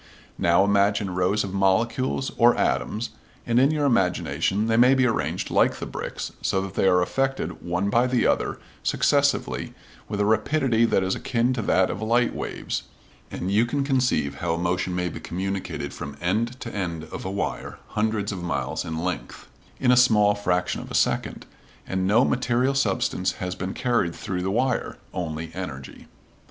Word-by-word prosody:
Now, 85 Hz, +2 st, +4 dB
imagine 100 Hz, -1 st, +2 dB
rows 90 Hz, +4 st, +1 dB
of 95 Hz, -2 st, -5 dB
molecules 115 Hz, +7 st, +1 dB
or 120 Hz, 0 st, +5 dB
atoms, 110 Hz, +3 st, -1 dB, 0.3 s
and 120 Hz, 0 st, +3 dB
in 135 Hz, +2 st, +5 dB
your 150 Hz, -1 st, 0 dB
imagination 100 Hz, -2 st, +1 dB
they 115 Hz, 0 st, +1 dB
may 125 Hz, +3 st, +6 dB
be 130 Hz, -1 st, +3 dB
arranged 115 Hz, -, -1 dB
like -, -, +3 dB
the -, -, -6 dB
bricks, -, -, -5 dB
so 95 Hz, -, +1 dB
that 95 Hz, -1 st, -6 dB
they 95 Hz, -, +2 dB
are 90 Hz, -1 st, +4 dB
affected 135 Hz, +7 st, -2 dB
one 90 Hz, +4 st, -1 dB
by 120 Hz, +3 st, +3 dB
the 125 Hz, -1 st, +1 dB
other -, -, +1 dB, 0.2 s
successively -, -, +1 dB, 0.3 s
with 105 Hz, -, -3 dB
a 100 Hz, -, +2 dB
rapidity 115 Hz, +2 st, +2 dB
that 95 Hz, -, +2 dB
is 95 Hz, 0 st, 0 dB
akin 120 Hz, +1 st, 0 dB
to 125 Hz, -, -2 dB
that 95 Hz, -2 st, +2 dB
of 100 Hz, -, -6 dB
light 115 Hz, +2 st, +2 dB
waves, -, -, -4 dB, 0.5 s
and 95 Hz, -, -4 dB
you 105 Hz, +3 st, +4 dB
can 140 Hz, +3 st, -1 dB
conceive 125 Hz, -, +1 dB
how 85 Hz, -1 st, 0 dB
a -, -, -4 dB
motion 90 Hz, +1 st, -1 dB
may 90 Hz, 0 st, -1 dB
be 85 Hz, -, -6 dB
communicated 95 Hz, +2 st, -4 dB
from 70 Hz, 0 st, -7 dB
end 115 Hz, +8 st, -1 dB
to 115 Hz, -, -6 dB
end 85 Hz, -5 st, -3 dB
of -, -, -6 dB
a 95 Hz, -, -3 dB
wire 100 Hz, +1 st, -3 dB
hundreds 105 Hz, -1 st, -1 dB
of 95 Hz, -3 st, -5 dB
miles 85 Hz, 0 st, -2 dB
in 80 Hz, -, -4 dB
length 90 Hz, -10 st, -5 dB, 0.3 s
in 125 Hz, -, +3 dB
a -, -, +6 dB
small 110 Hz, -5 st, +5 dB
fraction 90 Hz, -3 st, -1 dB
of -, -, -10 dB
a -, -, -5 dB
second, -, -, 0 dB, 0.4 s
and 95 Hz, 0 st, -1 dB
no 115 Hz, +6 st, +4 dB
material 125 Hz, +1 st, +1 dB
substance 100 Hz, -7 st, 0 dB
has 90 Hz, -1 st, -4 dB
been 95 Hz, 0 st, -5 dB
carried 120 Hz, -9 st, 0 dB
through 90 Hz, -1 st, -4 dB
the 95 Hz, -, -1 dB
wire 125 Hz, +5 st, 0 dB, 0.2 s
only 80 Hz, -2 st, -4 dB
energy. 75 Hz, -8 st, -7 dB
100 Hz, 180 wpm, -24 LUFS, 90-120 Hz, 0.5 s, may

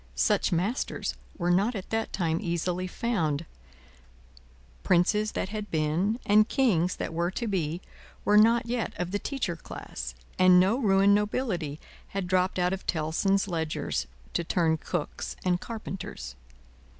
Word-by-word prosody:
Such 210 Hz, -1 st, +2 dB
masters 190 Hz, +9 st, -1 dB, 0.2 s
were 175 Hz, -1 st, +1 dB
not 200 Hz, +7 st, +2 dB
at 195 Hz, -, -6 dB
that 225 Hz, 0 st, -1 dB
time 165 Hz, -3 st, 0 dB
easily 180 Hz, 0 st, -1 dB
found; 170 Hz, -9 st, -1 dB, 1.4 s
Princes 210 Hz, -, +2 dB
that -, -, -2 dB
had 210 Hz, 0 st, -5 dB
been, 165 Hz, +9 st, 0 dB
and 210 Hz, +2 st, +5 dB
Kings 185 Hz, -, +2 dB
that -, -, -4 dB
were 170 Hz, +1 st, 0 dB
to 235 Hz, +6 st, -3 dB
be, 175 Hz, -5 st, -1 dB, 0.4 s
were 210 Hz, -, +4 dB
not 230 Hz, +3 st, +6 dB
yet 235 Hz, -1 st, -2 dB
of 180 Hz, 0 st, -3 dB
the 205 Hz, -, 0 dB
Teacher 245 Hz, -11 st, -2 dB
class, 65 Hz, -, -7 dB, 0.2 s
and 185 Hz, -1 st, +7 dB
no 190 Hz, +5 st, +4 dB
ruined 200 Hz, -3 st, +4 dB
nobility 205 Hz, -, -1 dB, 0.4 s
had 195 Hz, -, -1 dB
dropped 185 Hz, +1 st, +1 dB
out 180 Hz, 0 st, +2 dB
of 190 Hz, -, -6 dB
Tellson's 180 Hz, +5 st, +1 dB
ledgers, 160 Hz, -, -2 dB, 0.3 s
to -, -, 0 dB
turn 165 Hz, -1 st, +2 dB
cooks 155 Hz, 0 st, -4 dB
and 180 Hz, -1 st, +2 dB
carpenters. 190 Hz, -, -6 dB
185 Hz, 145 wpm, -28 LUFS, 170-210 Hz, 1.4 s, and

